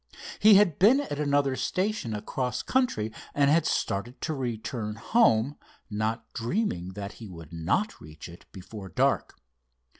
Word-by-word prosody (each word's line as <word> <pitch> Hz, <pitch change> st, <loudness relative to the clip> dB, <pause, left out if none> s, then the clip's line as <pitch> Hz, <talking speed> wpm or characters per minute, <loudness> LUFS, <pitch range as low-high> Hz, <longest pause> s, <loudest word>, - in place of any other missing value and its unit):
He 210 Hz, 0 st, +8 dB
had 195 Hz, -7 st, +4 dB
been 230 Hz, +9 st, +6 dB
at 145 Hz, -, -5 dB
another 145 Hz, -2 st, +2 dB
station 185 Hz, -, -1 dB
across 125 Hz, +4 st, -3 dB
country, 180 Hz, -, 0 dB, 0.2 s
and 140 Hz, 0 st, +4 dB
had 160 Hz, +1 st, +3 dB
started 115 Hz, +6 st, -2 dB
to 160 Hz, -, -2 dB
return 115 Hz, -4 st, -4 dB
home, 135 Hz, -, +2 dB, 0.3 s
not 110 Hz, +2 st, -3 dB
dreaming 115 Hz, -, -2 dB
that 100 Hz, +1 st, -6 dB
he 110 Hz, -3 st, -11 dB
could 85 Hz, -2 st, -11 dB
not 95 Hz, -, -1 dB
reach 75 Hz, 0 st, -10 dB
it 85 Hz, 0 st, -14 dB
before 95 Hz, +1 st, -9 dB
dark. -, -, +1 dB
120 Hz, 145 wpm, -27 LUFS, 105-165 Hz, 0.3 s, He